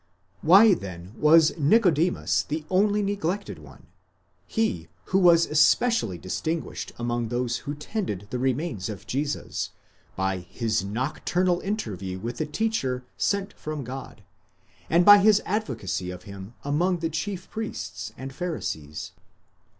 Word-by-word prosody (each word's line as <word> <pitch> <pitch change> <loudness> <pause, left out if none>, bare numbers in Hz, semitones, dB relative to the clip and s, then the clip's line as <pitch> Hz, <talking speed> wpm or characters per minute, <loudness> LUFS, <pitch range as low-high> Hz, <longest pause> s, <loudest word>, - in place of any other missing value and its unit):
why 195 +6 +7
then 90 - -6
was 155 +3 +5
Nicodemus 170 0 +3
the 155 +1 -4
only 205 +2 +3
neglected 200 0 -2
one—he 155 - -6 0.2
who 190 - +2
was 170 -2 +6
especially 150 - +3
distinguished 155 - -4
among 120 0 -1
those 120 +1 -1
who 145 - -2
tended 150 - -4
the 125 - -2
remains 130 - -1
of 105 -3 -7
Jesus, 145 +3 -2 0.5
by 95 0 0
his 110 +3 -2
nocturnal 155 - 0
interview 100 - -4
with 115 +6 -5
the 155 - -1
teacher 150 - -1
sent 200 0 -1
from 155 -2 -5
God, 125 -3 -8 0.7
and 170 +2 +4
by 205 0 +10
his 210 +1 +5
advocacy 115 - -2
of 90 0 -8
him 100 +3 -10
among 175 +6 +1
the 165 -1 -2
chief 185 +3 -4
priests 100 - -5
and 135 +1 -7
Pharisees? 80 - -4
150 Hz, 125 wpm, -26 LUFS, -, 0.7 s, by